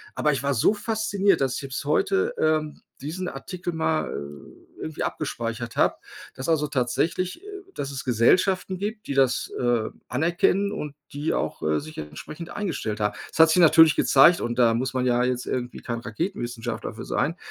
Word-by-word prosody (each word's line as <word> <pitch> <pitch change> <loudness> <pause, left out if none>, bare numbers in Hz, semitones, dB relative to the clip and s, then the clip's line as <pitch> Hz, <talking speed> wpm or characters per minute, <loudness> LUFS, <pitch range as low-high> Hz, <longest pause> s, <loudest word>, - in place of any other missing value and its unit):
Aber 150 - +2
ich 135 -1 -3
war 140 0 +1
so 115 - +4
fasziniert, 205 -3 +1
dass 135 -2 +1
ich - - -3
selbst 135 +1 -5
heute, 385 - +1
ähm, 155 -1 0 0.2
diesen 170 +6 -4
Artikel 175 +4 -5
mal, 160 -1 0
äh, 70 0 -10
irgendwie 155 -1 -4
abgespeichert 115 -5 -4
habe, - - +3 0.4
dass 130 - -4
also 155 -2 +2
tatsächlich, 165 - -1
äh - - -12 0.3
dass 140 - -4
es 140 -1 -5
Gesellschaften 185 - +2
gibt, 210 +2 -5
die - - -2
das, 135 -2 +2
äh, 120 -3 +1 0.2
anerkennen 175 +8 +1
und 150 -1 -5 0.2
die 145 +2 -1
auch, - - -2
äh, 75 0 +1
sich 155 +1 -10
entsprechend 150 - -8
eingestellt 160 - -3
haben. 105 -1 0
Das - - -9
hat 160 0 +8
sich 175 +3 +4
natürlich 160 -1 +7
gezeigt 165 +6 +6
und 120 +1 -2
da 115 -2 +5
muss 125 +2 -1
man 130 -1 0
ja 125 -1 +2
jetzt 125 0 -1
irgendwie 125 -1 -3
kein 120 -1 -4
Raketenwissenschaftler 120 - -4
für - - -7
sein, - - -1
145 Hz, 180 wpm, -25 LUFS, 125-175 Hz, 0.4 s, hat